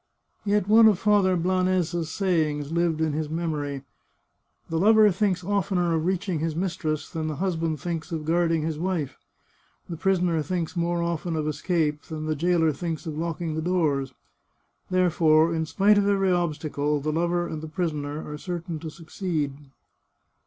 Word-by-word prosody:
Yet 205 -1 +1
one 220 +1 +7
of 210 -4 +4
Father 200 -2 +3
Blanes's 180 -2 0
sayings 155 -5 0
lived 170 -1 +1
in 160 -2 +1
his 155 0 -2
memory: 150 -4 -3 0.4
" - - -44
The 165 - 0
lover 215 +2 +6
thinks 185 -1 0
oftener 185 -3 0
of 160 +1 0
reaching 185 -2 -1
his 160 0 -2
mis 175 0 -1
tress 155 -3 -2
than 160 -3 -4
the 155 - -3
husband 165 -3 -1
thinks 170 +2 -4
of 160 -2 -3
guarding 165 -1 +1
his 155 -1 -3
wife; 170 -6 -2 0.7
the 170 - -5
prisoner 175 -1 +1
thinks 170 +2 -3
more 170 0 0
often 170 0 -2
of 155 -1 -1
escape 155 -1 0
than 155 -1 -6
the 155 0 -1
jailer 165 0 +2
thinks 165 +3 -4
of 155 -2 -4
locking 165 0 -3
the 160 - -2
doors. 150 -7 0 0.7
Therefore, 170 -3 +3
in 160 -1 -1
spite 205 +5 +4
of 200 - +1
every 195 -2 +2
obstacle, 150 -4 0
the 155 +2 -2
lover 175 +2 0
and 160 -2 -5
the 160 - -6
prisoner 155 -3 -3
are 150 0 -6
certain 170 -2 -5
to 160 +1 -6
succeed." 160 -2 -3
165 Hz, 170 wpm, -25 LUFS, 155-180 Hz, 0.7 s, one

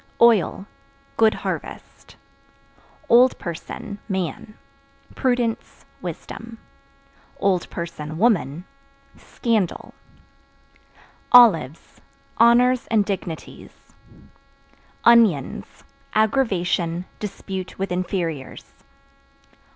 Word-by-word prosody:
Oil 220 -4 +3 0.5
Good 220 -1 +4
harvest. - - -7 0.9
Old 245 +2 +5
Person 180 +4 -7
(Man) 190 +3 -4 0.6
prudence, 245 -3 -2 0.2
wisdom; 230 0 -8 0.8
(woman) 170 - -1 0.5
scandal. 220 -7 -2 1.4
Olives 170 - +4 0.4
Honors 245 +2 +4
and 215 -3 +2
dignities. 185 -5 -7 1.1
Onions 225 - +4 0.5
Aggravation, 185 -7 0
dispute 190 -2 -6
with 195 -1 -3
inferiors. 175 -6 -4
195 Hz, 60 wpm, -22 LUFS, 170-230 Hz, 1.4 s, Old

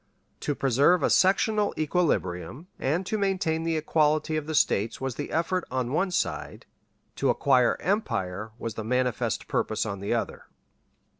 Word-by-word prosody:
To 145 - -2
preserve 140 +8 +3
a - - +2
sectional 205 +2 +3
equilibrium 145 - -1
and 165 +8 0
to 215 +3 -2
maintain 185 -5 0
the 165 -1 0
equality 155 0 +1
of 155 -1 -3
the 160 - -2
States 110 -5 +1
was 135 -1 -3
the 145 - -5
effort 170 +3 0
on 125 -1 -2
one 185 +6 +1
side, 180 - -3 0.5
to - - +1
acquire 125 -4 +3
empire 110 - -2
was 115 -2 -4
the 110 - -5
manifest 125 +1 -1
purpose 110 - -1
on 100 -2 -4
the 100 - -4
other. - - -2
150 Hz, 155 wpm, -27 LUFS, 120-175 Hz, 0.5 s, preserve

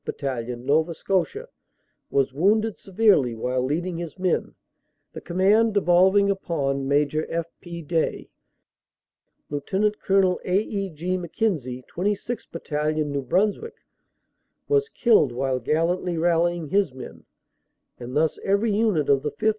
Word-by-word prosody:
Battalion, 125 -3 -4
Nova 160 +4 +2
Scotia, 195 - -1 0.6
was 135 -1 +1
wounded 210 +8 +2
severely 190 - +2
while 125 +3 -1
leading 165 +6 -2
his 170 0 -7
men, 185 -2 -1 0.6
the - - -8
command 205 +5 +2
devolving 190 +1 +4
upon 140 -8 -2
Major 145 +2 +1
F. 170 0 -2 0.2
P. 170 -1 -8
Day, 160 +1 -2 1.2
Lt. 145 -1 -5 0.3
Col. 190 -2 +3
A. 180 +1 +1
E. 200 -2 -3
G. 175 +3 -3
Mc 175 -3 -7
Kenzie, 135 - -2
26th 205 +5 -2
Battalion, 155 -2 -2
New 140 0 -1
Brunswick, 205 - -1 0.8
was 430 0 +2
killed 225 - +3
while 130 +1 -1
gallantly 170 +6 0
rallying 170 -1 +1
his 195 -4 +2
men, 130 - -10 0.7
and 125 +1 -7
thus 160 0 +1
every 200 +3 +1
unit 205 -8 +1
of 140 -1 +3
the 150 - -2
5th. 220 +8 0
170 Hz, 130 wpm, -24 LUFS, 145-195 Hz, 1.2 s, devolving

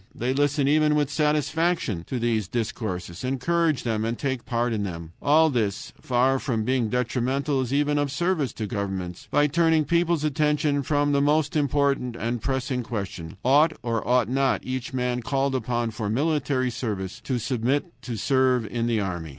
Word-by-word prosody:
They 125 +2 -1
listen 145 0 +1
even 150 +1 +3
with 150 -1 +1
satisfaction 150 - 0
to 130 - -3
these 115 -4 0
discourses, 95 -5 -4
encourage 155 +4 +1
them, 110 -2 -1
and 115 +1 -2
take 130 -3 -3
part 120 0 0
in 105 - -1
them. 85 -4 -5
All 155 +2 +4
this, 105 -6 -2
far 130 +2 +2
from 120 -7 -1
being 125 -1 0
detrimental, 130 +3 0
is 125 -1 -3
even 145 +1 +2
of 145 -1 -1
service 160 -1 0
to 110 - -4
governments, 95 -4 -4
by 145 - +3
turning 160 +1 +3
people's 170 0 +1
attention 150 -1 +1
from 145 +1 +1
the 140 0 +2
most 150 +1 +2
important 140 -4 +1
and 120 0 -3
pressing 130 -1 -1
question: 95 -8 -5
Ought 150 +5 +5
or 115 -2 -1
ought 125 -2 +3
not 135 +1 +1
each 130 -1 -4
man 125 -1 -1
called 135 +3 0
upon 120 -2 -1
for 105 -1 -4
military 135 0 0
service 105 -6 -4
to 130 - 0
submit 125 +3 0 0.2
to 120 -3 -5
serve 130 -1 +2
in 115 +3 -2
the 115 -2 +1
army? 85 -5 -3
130 Hz, 175 wpm, -25 LUFS, 115-145 Hz, 0.2 s, Ought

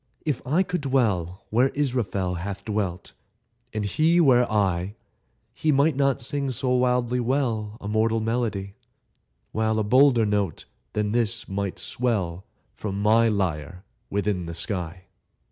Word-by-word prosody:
If 150 -5 -1
I 160 +8 +3
could 180 -2 -3
dwell 105 -10 0
Where 125 +5 +4
Israfel 115 -10 -1
Hath 100 +2 -5
dwelt, 100 -5 -3 0.6
and 110 -1 -2
he 160 - +3
were 125 -7 +4
I, 95 -2 0 0.6
He 155 - +1
might 145 +1 +3
not 135 -3 +1
sing 140 +2 -2
so 130 +1 -2
wildly 125 -1 +2
well 115 -4 -1
A 100 - -7
mortal 110 +1 +1
melody, 110 -4 -2 0.8
While 110 0 0
a 110 - +1
bolder 125 +1 +5
note 105 -5 -1 0.3
than 105 -1 0
this 115 -1 -1
might 100 -1 -3
swell 95 -8 -2 0.3
From 100 -2 -4
my 110 +3 +4
lyre 90 -4 -2 0.3
within 100 -3 -1
the 85 - -6
sky. 90 -3 -4
110 Hz, 140 wpm, -25 LUFS, 100-125 Hz, 0.8 s, bolder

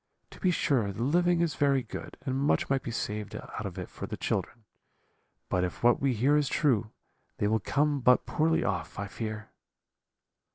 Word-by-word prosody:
To - - -13
be 185 - +2
sure, 130 - +1
the 105 +4 -4
living 175 +5 +3
is 170 -3 +1
very 140 -2 +2
good, - - -8
and 130 -2 -1
much 140 0 +1
might 135 -1 +2
be - - -6
saved 105 -2 -4
out - - -6
of - - -8
it - - -4
for - - -7
the - - -5
children, 115 - -2 0.8
but 90 - +1
if 90 +4 -4
what 120 0 +5
we 135 -3 +2
hear 135 +7 +3
is 150 -3 +2
true 120 -8 +2 0.5
they 105 - +1
will 110 +1 +2
come 145 +7 +1
but 125 0 +4
poorly 160 +1 +1
off, 90 -4 -2
I 100 - -2
fear.' 110 +1 -5
125 Hz, 195 wpm, -29 LUFS, 110-145 Hz, 0.8 s, what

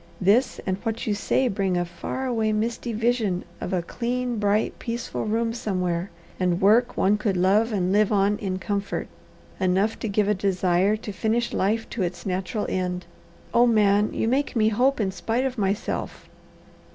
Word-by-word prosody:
This 205 +8 +3
and 190 -1 -1
what 225 +1 -3
you 215 - +1
say 255 +5 +1
bring 195 -4 0
a 175 - 0
far 175 +9 -5
away, 225 -4 0
misty 230 +2 -2
vision 225 -5 0
of - - -4
a 180 -2 0
clean, 245 +3 -2
bright, 205 +1 +1
peaceful 235 -1 -4
room 225 +1 0
somewhere, 185 -5 -2 0.3
and 180 -1 +1
work 225 +5 +4
one 205 +2 +3
could 205 -4 0
love 205 +6 +3
and 185 -3 0
live 210 0 +3
on 205 0 +2
in 190 -3 -2
comfort; 200 +1 -3 0.5
enough 190 +4 +1
to - - -3
give 205 0 +1
a 210 - +3
desire 190 +1 +1
to 215 -1 -7
finish 225 +4 -1
life 220 +4 0
to 225 - -3
its 175 -1 -3
natural 190 +3 -2
end. 180 -1 -2 0.5
Oh 240 +1 +5
Man, 210 -2 +3
you - - -1
make 270 +4 0
me 220 -1 +4
hope 255 +5 +2
in 195 -3 0
spite 225 +7 -1
of 255 -3 -3
myself!" 200 +1 -2
210 Hz, 175 wpm, -25 LUFS, 190-230 Hz, 0.5 s, Oh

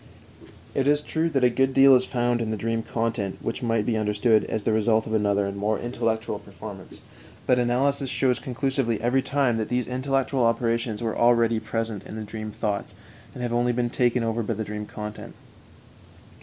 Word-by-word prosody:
It 135 0 0
is 145 0 +3
true 160 +2 -1
that 135 -5 0
a 125 - +6
good 135 +2 +1
deal 135 0 +8
is 130 0 +4
found 120 -1 0
in 110 - -2
the 110 - -2
dream 115 +2 -1
content 110 -4 -2
which 115 - -4
might 115 -3 0
be 115 - 0
understood 110 +1 +2
as 110 -2 -3
the 110 - +1
result 110 0 +2
of 110 - -4
another 100 -2 +2
and 100 0 -4
more 105 +2 0
intellectual 115 -1 -2
performance; - - -11 0.4
but 125 - +3
analysis 135 +3 +1
shows 125 -1 +1
conclusively 130 -2 -1
every 125 +3 +2
time 135 -4 +1
that 110 - -2
these 125 -1 0
intellectual 130 0 0
operations 115 -1 0
were 110 -1 -1
already 115 -1 +3
present 110 -1 -3
in - - -8
the 110 - -5
dream 110 +1 -6
thoughts, 105 -1 -3 0.4
and 125 - -5
have 120 -1 -2
only 120 +1 +2
been 120 0 -1
taken 125 -1 +1
over 115 +1 -1
by 115 0 -2
the 110 - -3
dream 105 0 -6
content. 105 0 -8
115 Hz, 195 wpm, -25 LUFS, 110-125 Hz, 0.4 s, deal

